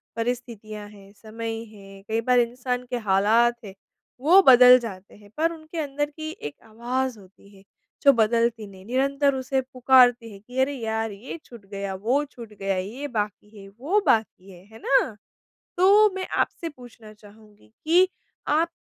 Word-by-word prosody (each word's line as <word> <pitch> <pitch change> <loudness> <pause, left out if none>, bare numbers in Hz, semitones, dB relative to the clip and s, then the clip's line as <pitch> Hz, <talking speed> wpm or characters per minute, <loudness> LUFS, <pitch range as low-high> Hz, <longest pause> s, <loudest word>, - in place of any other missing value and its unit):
परिस्थितियाँ 225 -3 -5
हैं, 200 -1 -16
समय 225 +2 -6 0.2
है, 195 -1 -14
कई 225 +1 -1
बार 250 +1 +3
इंसान 250 +1 -2
के 245 - -2
हालात 220 +5 +3
हैं, 195 - -9 0.5
वो 355 +8 +6
बदल 250 0 +9
जाते 200 -5 -9
हैं। 205 0 -18
पर 325 +2 +1
उनके 320 +1 -11
अंदर 290 0 -2
की 310 +1 -7
एक 145 -1 -6
आवाज़ 240 +2 -3
होती 195 +1 -19
है, 195 - -19 0.4
जो 280 - +7
बदलती 230 -1 +1
नहीं, 190 -1 -15
निरंतर 275 +3 +1
उसे 265 0 -1
पुकारती 250 -2 +3
है 200 - -12
कि, 245 +6 -7
अरे! 275 +2 +1
यार, 225 -3 -3
ये 210 +10 -8
छूट 235 -5 -14
गया, 200 -1 -4
वो 245 +10 0
छूट 235 -6 -13
गया, 195 -1 -1
ये 235 +10 -5
बाकी 210 -2 -5
है, 195 - -12
वो 275 - -1
बाकी 195 -4 0
है। 180 0 -16
है 225 - -12
ना? 265 -5 +2 0.6
तो 405 +4 +5
मैं 380 -1 -4
आपसे 335 - -2
पूछना 245 -6 -14
चाहूँगी 210 - -19 0.2
कि 355 +4 +4 0.4
आप 320 +3 +2
235 Hz, 170 wpm, -24 LUFS, 210-265 Hz, 0.6 s, बदल